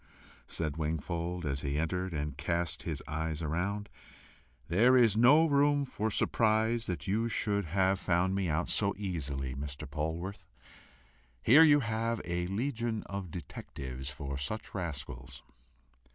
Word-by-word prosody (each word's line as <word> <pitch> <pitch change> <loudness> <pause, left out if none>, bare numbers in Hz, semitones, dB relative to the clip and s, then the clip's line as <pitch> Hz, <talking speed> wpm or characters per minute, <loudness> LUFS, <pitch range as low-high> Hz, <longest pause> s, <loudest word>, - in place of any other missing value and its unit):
said 80 -2 -3
Wingfold, 85 +2 -2
as 70 -1 -1
he 70 0 -1
entered 90 +4 -1
and 75 -3 -3
cast 85 +2 -1
his - - -4
eyes 80 +1 -3
around, 95 +7 -2 0.8
"there 115 +10 +5
is 115 -5 +5
no 135 +8 +6
room 145 -1 +3
for 110 -4 -2
surprise 110 +1 +2
that 90 - -3
you 110 +4 0
should 100 -3 0
have 95 +3 +2
found 90 +1 +1
me 95 -2 0
out 80 +3 0
so 100 -1 0
easily, 70 -9 -3
Mr. 70 +2 -6
Polwarth! 80 +7 -4 1.0
Here 140 +8 +8
you 145 -2 +7
have 115 0 -1
a 90 0 -1
legion 115 +1 -2
of 100 -2 -5
detectives 65 -5 -7
for 70 0 -5
such 90 +11 -5
rascals." 70 -9 -6
90 Hz, 135 wpm, -31 LUFS, 75-110 Hz, 1.0 s, Here